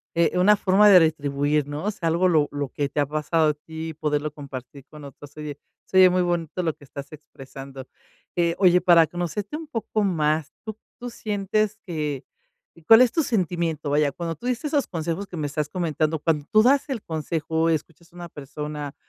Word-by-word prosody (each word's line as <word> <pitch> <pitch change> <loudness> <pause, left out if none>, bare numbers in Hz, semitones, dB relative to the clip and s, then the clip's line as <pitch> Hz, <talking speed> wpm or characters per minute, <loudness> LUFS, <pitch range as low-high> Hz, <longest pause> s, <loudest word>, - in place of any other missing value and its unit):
eh, 170 +1 +2
una 205 +3 +6
forma 195 +2 +4
de 190 -3 +9
retribuir, 145 -2 +1
¿no? 145 +2 -5
O 210 - +1
sea, 190 -5 -4
algo 175 +3 +2
lo 155 -4 +3
lo 145 -2 -3
que 145 0 -2
te 145 - -1
ha - - +2
pasado 155 +2 +1
a - - +1
ti 160 +1 -7
poderlo 150 -1 -2
compartir 140 -2 -10
con 150 +1 -13
otros. 140 +1 -12
Oye, 150 -2 -6 0.3
se 190 - -1
oyé 185 -1 +8
muy 180 0 +1
bonito 175 0 -2
lo 160 -2 0
que 145 - -18
estás 140 +2 -9
expresando. 135 -2 -11 0.5
Eh, 170 -1 +2
oye, 180 -2 +5
para 170 -2 +6
conocerte 175 - -4
un 320 0 -9
poco 225 -5 -2
más, 155 -5 0
¿tú 220 -1 -6 0.2
tú 245 0 -6
sientes 215 -1 -1
que, 150 -6 -3 0.6
cuál 225 +1 +9
es 250 -2 +5
tu 330 - +1
sentimiento? 170 - -1
Vaya, 145 0 +2
cuando 165 +3 -5
tú 240 - -7
dices 250 +2 -2
esos 285 -2 +1
consejos 170 +3 -4
que 180 - -8
me 150 - -2
estás 150 +1 -3
comentando, 160 -3 -1
cuando 150 -1 0
tú 215 0 +6
das 275 +4 +3
el 255 -6 -4
consejo 160 0 -1
y - - +4
escuchas 165 +3 -10
a - - -19
una 175 -1 -8
persona 150 0 -7
160 Hz, 205 wpm, -24 LUFS, 150-185 Hz, 0.6 s, de